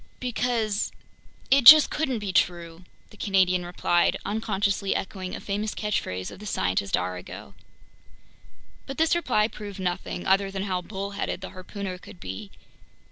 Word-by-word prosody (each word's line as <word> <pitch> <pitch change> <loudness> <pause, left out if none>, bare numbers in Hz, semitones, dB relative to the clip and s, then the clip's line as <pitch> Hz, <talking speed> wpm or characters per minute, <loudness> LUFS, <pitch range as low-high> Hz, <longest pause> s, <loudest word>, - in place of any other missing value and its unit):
"Because... 235 -4 -1 0.6
it 275 0 +6
just 305 +4 +11
couldn't 270 -5 -1
be 205 -3 -4
true!" 170 -1 0 0.3
the 210 - -16
Canadian 185 -3 +2
replied, 175 0 +1
unconsciously 200 -2 -1
echoing 190 -1 -4
a - - -6
famous 210 +2 -3
catchphrase 95 - -2
of - - -11
the 210 - -8
scientist 95 - 0
Arago. 90 0 -6 1.3
But 270 - -6
this 320 0 +3
reply 240 -11 +2
proved 205 -3 -9
nothing, 180 -1 -3
other 195 +1 +3
than 195 0 -4
how 185 -2 -1
bullheaded 200 0 -4
the 190 - -7
harpooner 185 0 -6
could 180 - -14
be. 95 +2 -7
195 Hz, 140 wpm, -26 LUFS, 180-210 Hz, 1.3 s, just